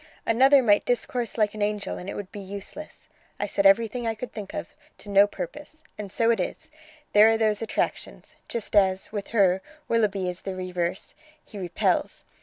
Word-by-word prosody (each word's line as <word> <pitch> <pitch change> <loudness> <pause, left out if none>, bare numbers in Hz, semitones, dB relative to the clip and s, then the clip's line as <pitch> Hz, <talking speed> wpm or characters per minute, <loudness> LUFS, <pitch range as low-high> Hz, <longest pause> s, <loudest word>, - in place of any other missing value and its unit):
Another 265 +4 +5
might 205 -3 +4
discourse 245 -1 -1
like 210 -2 +2
an 215 - -6
angel 205 0 -2
and 180 - -7
it - - -5
would 200 -2 -7
be 205 - -8
useless. 200 +10 -9 0.3
I - - 0
said 200 -1 +3
everything 230 +4 +2
I 225 - -1
could 230 +2 -7
think 205 -3 -7
of, - - -6 0.2
to 205 - -12
no 200 0 +6
purpose. 295 - -8
And 205 -2 -7
so 230 +3 +3
it 225 - +1
is: 180 - -4 0.4
there 210 +2 +8
are 225 - +3
those 215 -1 +1
attractions! 225 - -3
just 230 -2 -4
as, 190 -2 +3
with 205 -2 -4
her, 190 -4 +3 0.3
Willoughby 205 -5 +1
is 180 0 -4
the 190 -1 -5
reverse, 180 -1 -3 0.3
he 210 - -10
repels. 175 -2 -1
205 Hz, 190 wpm, -26 LUFS, 195-230 Hz, 0.4 s, there